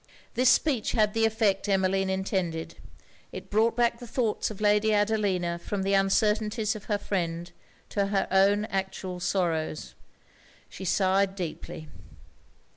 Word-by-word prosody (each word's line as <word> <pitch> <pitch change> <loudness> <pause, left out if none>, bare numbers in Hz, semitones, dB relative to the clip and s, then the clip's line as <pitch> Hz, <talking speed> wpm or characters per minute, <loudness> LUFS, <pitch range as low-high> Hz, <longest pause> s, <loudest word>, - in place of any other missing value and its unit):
This 255 +1 +4
speech 255 -4 +2
had 215 -2 +2
the 225 0 +3
effect 215 -2 0
Emmeline 195 0 +1
intended. 190 -4 -2 0.6
It - - -9
brought 220 +2 +2
back 235 -1 +2
the 240 - -9
thoughts 230 -2 -1
of 215 - -9
Lady 210 +1 +3
Adelina 200 -5 0
from 195 +3 -3
the 195 +1 0
uncertainties 210 +3 +1
of 210 - -9
her 210 - 0
friend 175 -4 -3 0.4
to 200 -1 0
her 195 -1 0
own 200 +2 +4
actual 190 -2 -4
sorrows. 165 - -1 0.8
She 190 - -8
sighed 190 +1 +2
deeply. 160 -3 -6
195 Hz, 135 wpm, -27 LUFS, 185-215 Hz, 0.8 s, This